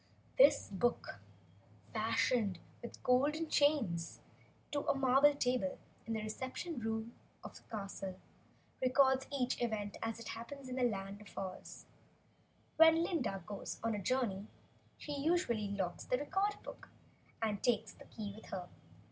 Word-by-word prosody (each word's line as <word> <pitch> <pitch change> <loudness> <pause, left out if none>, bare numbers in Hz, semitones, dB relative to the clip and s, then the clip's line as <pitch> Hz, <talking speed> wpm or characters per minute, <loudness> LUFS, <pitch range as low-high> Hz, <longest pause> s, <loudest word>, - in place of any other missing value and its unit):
This - - +6
book, 205 - -1 0.7
fastened 225 -2 +2 0.2
with 235 - -9
golden 290 +6 +3
chains 255 - +2 0.5
to 290 - +1
a - - +3
marble 270 +2 +5
table 255 +1 0 0.3
in 225 - -1
the 220 -1 -2
reception 260 +7 -4
room 225 +1 -3 0.3
of - - -9
the - - -12
castle, 195 -3 -5 0.6
records 265 +1 +4
each 255 -3 0
event 215 -4 -2
as 225 0 -2
it 230 - -7
happens, 260 +4 -7
in 255 0 -4
the - - 0
Land 195 -1 -5
of 210 - -14
Oz. 190 -1 -6 0.9
When 325 +1 +7
Glinda 265 - -1
goes 205 -1 -5
on 230 0 +1
a 210 - -1
journey, 210 -3 0 0.5
she 295 - -7
usually 280 - +1
locks 190 -3 -2
the 250 - +1
Record 390 +9 0
book - - -10 0.5
and 215 -3 -1
takes 225 -2 +1
the - - -15
key 205 -3 -6
with 220 - -12
her. 180 -2 -5
235 Hz, 145 wpm, -36 LUFS, 205-275 Hz, 0.9 s, When